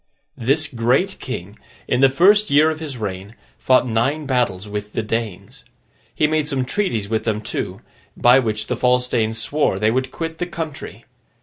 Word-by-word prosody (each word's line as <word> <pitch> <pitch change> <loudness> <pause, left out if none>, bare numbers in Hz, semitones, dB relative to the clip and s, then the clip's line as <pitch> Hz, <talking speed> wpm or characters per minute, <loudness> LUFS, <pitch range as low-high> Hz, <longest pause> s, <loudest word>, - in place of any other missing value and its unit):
This 140 +6 +1
great 130 +11 0
king, 105 -5 -7 0.3
in 125 - +1
the 135 - +7
first 200 +9 +4
year 155 +3 +5
of 155 - -6
his 150 -5 -6
reign, 100 0 -5 0.2
fought 130 -1 +3
nine 130 +7 0
battles 120 -7 0
with 105 0 -6
the 115 - -1
Danes. 115 +2 -4 0.5
He - - +2
made 155 -1 +1
some 135 -3 0
treaties 125 - -1
with 110 +1 -1
them 110 -2 -1
too, 110 - -5 0.4
by 125 +2 +6
which 110 -3 -2
the 125 - -2
false 125 +1 +2
Danes 115 -2 0
swore 115 -2 0
they 110 +2 +2
would 130 +2 -1
quit 165 +3 -5
the 175 - -2
country. 160 -4 -7
125 Hz, 180 wpm, -20 LUFS, 110-150 Hz, 0.5 s, the